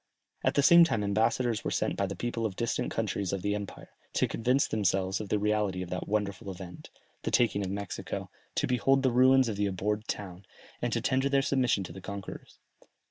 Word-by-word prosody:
At - - +1
the 145 - +3
same 170 +3 +8
time 115 -10 +1
ambassadors 110 +3 +1
were - - -1
sent - - -1
by - - 0
the - - -5
people 120 -1 -3
of 110 -3 -1
the 95 - -7
distant 115 - -1
countries 100 -4 -2
of 95 -2 -3
the 100 - 0
empire, 105 -1 -6 0.2
to - - +2
convince 125 +5 +1
themselves 95 -1 0
of 105 - -7
the 105 - +2
reality 105 -3 0
of 90 - -9
that 90 - -3
wonderful 100 -2 -2
event, 90 -2 -9 0.3
the - - -2
taking 115 -5 +2
of 95 - -3
Mexico, 100 +1 -5 0.2
to - - +1
behold 135 +2 +2
the 130 - +3
ruins 130 +1 +5
of 105 -3 -3
the 105 0 +1
abhorred 105 +3 -2
town, 95 -2 -5 0.4
and - - -1
to - - 0
tender 135 +1 +1
their 140 -1 +3
submission 125 -7 +1
to 90 - -8
the 95 - -9
conquerors. 100 0 -8
105 Hz, 215 wpm, -29 LUFS, 100-125 Hz, 0.4 s, same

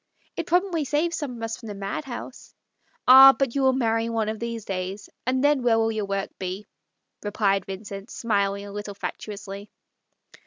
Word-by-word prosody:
"It 335 - -4
probably 355 -2 +1
saves 305 +4 0
some 280 -5 -4
of 230 - -8
us 225 0 -3
from 230 - -11
the 205 - -6
madhouse." 240 +6 -6 0.3
" - - -40
Ah, 265 +1 +10
but 270 -4 0
you 280 - 0
will 265 0 +5
marry 230 -2 +1
one 225 -2 0
of 220 0 -4
these 230 -2 -4
days, 190 +1 -4 0.2
and 260 +1 +1
then 290 -2 +4
where 235 -2 +3
will 225 0 +2
your 215 -2 -2
work 195 0 -2
be? 190 +2 -4 0.3
" - - -29
replied 200 -2 0
Vincent, 195 +2 -7
smiling 200 -3 -1
a 200 - -9
little 205 0 -6
fatuously. 200 0 -7
225 Hz, 190 wpm, -25 LUFS, 200-260 Hz, 0.3 s, Ah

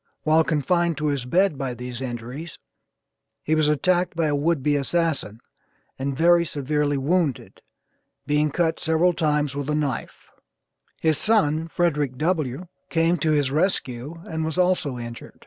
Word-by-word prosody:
While 160 +1 +4
confined 170 +2 +1
to 150 - -2
his 140 -4 -2
bed 175 +3 +2
by 130 -3 -3
these 125 +1 -7
injuries 125 +6 -6 0.9
he 155 - 0
was 155 -1 +3
attacked 175 +4 +1
by 165 0 +1
a 145 - +1
would 150 -1 0
be 145 +1 +2
assassin, 145 -6 -1 0.6
and 135 0 -2
very 170 +2 +5
severely 145 -1 -1
wounded, 150 -1 -1 0.6
being 150 +1 +2
cut 165 +2 0
several 165 +2 +2
times 150 -3 0
with 145 0 -3
a 150 - +1
knife 145 -5 -3 0.7
his 160 -2 +1
son 165 -8 +2
Frederick 150 -7 0
W. 155 -1 -1 0.2
came 165 +1 +2
to 155 - 0
his 145 -3 +2
rescue 145 -4 -1
and 160 0 -3
was 160 +2 -3
also 180 -8 +1
injured. 120 -1 -9
150 Hz, 150 wpm, -24 LUFS, 140-170 Hz, 0.9 s, very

